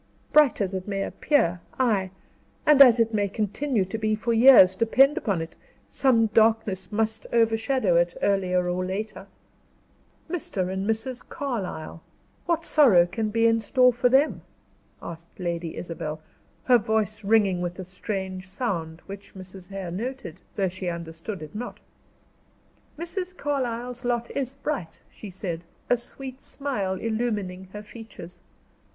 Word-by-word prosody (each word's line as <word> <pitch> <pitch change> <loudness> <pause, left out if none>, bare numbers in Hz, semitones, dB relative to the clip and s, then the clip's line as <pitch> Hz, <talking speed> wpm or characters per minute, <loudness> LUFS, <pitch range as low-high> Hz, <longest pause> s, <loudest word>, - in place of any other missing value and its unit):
"Bright 295 -7 +5
as 195 -1 -1
it 185 0 -4
may 195 -1 -1
appear, 180 - +1 0.2
ay, 210 -7 +2 0.6
and 300 -2 +6
as 245 -3 +8
it 225 0 +2
may 205 -2 +1
continue 215 +2 -1
to 220 +4 -5
be 215 -1 +1
for 230 +2 -1
years, 225 -6 +8
depend 265 +7 +4
upon 190 -7 -1
it, 165 - -11 0.3
some 245 -4 +3
darkness 220 -3 +2
must 220 0 -1
overshadow 225 -3 +2
it, 175 0 +1
earlier 185 -2 +1
or 180 +1 -1
later." 190 +1 -5 1.0
"Mr. 210 - -3
and 190 +2 -2
Mrs. 230 +3 -2
Carlyle 200 - -4 0.5
what 335 -1 0
sorrow 225 - +6
can 215 +5 -2
there - - -4
be 230 0 +3
in 225 0 +3
store 250 +3 +4
for 245 +1 +2
them?" 270 +4 +3 0.6
asked 170 +2 -10
Lady 170 -2 -3
Isabel, 155 -3 -5 0.4
her 250 -2 +5
voice 220 0 -1
ringing 200 -4 +3
with 175 0 -3
a 190 - -5
strange 190 0 -5
sound, 170 -7 -3
which 200 0 -10
Mrs. 185 0 -11
Hare 195 -3 -5
noted, 225 -3 -5
though 195 -2 +1
she 185 +1 -5
understood 170 +2 -6
it 155 - -10
not. 240 +3 -6 1.2
"Mrs. 360 +2 -5
Carlyle's 250 -3 -3
lot 240 -1 -1
is 270 -1 -3
bright," 275 - -4
she 210 - -10
said, 175 -3 -5 0.3
a - - +7
sweet 260 +2 -9
smile 250 -10 -3
illumining 210 -4 -2
her 210 0 -7
features. 210 -5 -11
215 Hz, 145 wpm, -25 LUFS, 185-245 Hz, 1.2 s, as